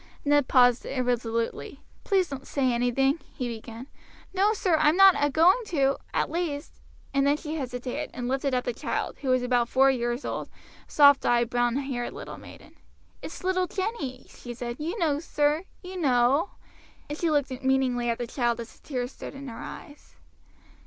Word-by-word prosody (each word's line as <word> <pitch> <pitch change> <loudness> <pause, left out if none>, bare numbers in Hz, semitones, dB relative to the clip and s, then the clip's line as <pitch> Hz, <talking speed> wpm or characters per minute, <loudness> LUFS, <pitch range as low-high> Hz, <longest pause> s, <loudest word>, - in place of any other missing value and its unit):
Ned 290 -2 +3
paused 245 -2 +4
irresolutely. 245 0 -2 0.2
"Please 380 -3 +2
don't 275 -3 -8
say 260 -3 +1
anything," 270 +5 +1 0.2
he 250 - -3
began. 230 +1 -7 0.5
"No, 395 +2 +3
sir, 380 -5 +1
I 305 -1 +4
am 320 - +1
not 390 -1 +9
a 290 - +1
going 335 - +5
to 275 -6 +1
at - - -1
least 325 -4 -4
" - - -29
and 275 0 +2
then 290 +1 +3
she 305 -1 -6
hesitated, 250 -4 -4
and 245 -1 -5
lifted 270 +1 0
up 250 - 0
the 245 - -2
child, - - -3
who 270 - -3
was 255 -1 +3
about 245 -1 +1
four 270 +1 +5
years 240 0 -2
old, - - -4 0.4
a - - -21
soft 285 -2 +6
eyed, 240 0 +2
brown 240 0 +1
haired 265 -3 -3
little - - -8
maiden. - - -14 0.5
"It's - - -8
little 370 0 +1
Jenny," 320 - -4
she 240 -1 -10
said; 240 0 -5
"you 330 +8 -3
know 305 -6 +1
sir, 300 +1 0 0.2
you 365 0 -7
know;" 270 +5 +3 0.6
and 295 - -4
she 335 +1 0
looked 285 -3 +1
meaningly 260 -2 +1
at 230 - 0
the 240 - -3
child 240 -1 -1
as 230 0 -9
the - - -24
tears 250 -3 -3
stood - - -9
in 275 0 -8
her 230 - -9
eyes. 290 0 -11
270 Hz, 190 wpm, -27 LUFS, 245-300 Hz, 0.6 s, not